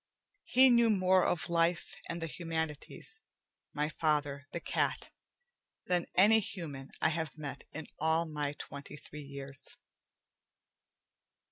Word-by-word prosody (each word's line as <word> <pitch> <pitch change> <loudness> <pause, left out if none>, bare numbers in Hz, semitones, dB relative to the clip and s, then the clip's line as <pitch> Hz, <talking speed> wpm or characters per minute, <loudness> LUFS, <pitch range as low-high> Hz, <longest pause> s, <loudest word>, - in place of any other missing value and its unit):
He 260 0 +7
knew 235 -1 +6
more 185 -3 +4
of 170 - 0
life 170 0 +1
and 170 0 -3
the - - +1
humanities, 165 - -4 0.5
my 150 +1 0
father, 145 -2 0
the - - -3
cat, - - -1 0.7
than 175 -1 +1
any 215 +4 +7
human 155 -10 -6
I - - +6
have 160 -2 -3
met 140 -2 -6
in 160 0 -6
all 160 +1 +3
my 150 -2 -2
twenty 140 0 -8
three 150 +1 -9
years. 140 -1 -6
160 Hz, 125 wpm, -33 LUFS, 145-180 Hz, 0.7 s, He